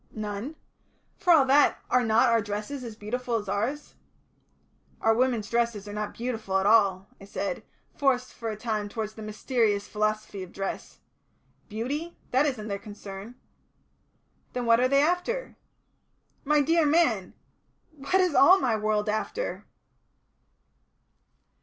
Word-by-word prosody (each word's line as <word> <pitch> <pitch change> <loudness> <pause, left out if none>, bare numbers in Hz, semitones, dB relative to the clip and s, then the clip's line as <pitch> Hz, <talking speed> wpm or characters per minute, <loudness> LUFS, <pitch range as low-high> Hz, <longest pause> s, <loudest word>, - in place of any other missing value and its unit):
"None. 215 +7 -5 0.6
For 385 -4 +2
all 305 -5 +7
that, 280 +2 +4
are 250 0 +4
not 225 0 +4
our 230 -1 +3
dresses 210 +6 -5
as 230 -3 -7
beautiful 235 +3 -3
as 215 -2 -1
yours?" 220 +9 -3 1.1
"Our 225 - +3
women's 235 -3 +1
dresses 235 -3 -1
are 205 - -7
not 210 0 -4
beautiful 225 -5 -2
at 190 - 0
all," 200 -3 +4
I - - -10
said, 350 - -3 0.3
forced 255 -2 +1
for 230 -1 -5
a 215 - -3
time 215 -2 -2
towards 215 0 -4
the 220 - -10
mysterious 215 -1 0
philosophy 215 -2 -2
of 185 -1 -9
dress. 195 0 -5 0.7
"Beauty? 280 +10 -4
That 270 +4 +3
isn't 230 -7 -3
their 200 -1 -3
concern." 205 +2 -9 1.2
"Then 250 -1 -2
what 230 0 +5
are 255 - +4
they 275 +2 +4
after?" 360 +10 -1 0.9
"My 300 +1 +3
dear 325 +2 +3
man! 250 - +2 0.6
What 295 +3 -3
is 365 -4 +3
all 365 +9 +7
my 240 -9 +1
world 215 0 0
after?" 220 - -3
230 Hz, 140 wpm, -27 LUFS, 210-275 Hz, 1.2 s, all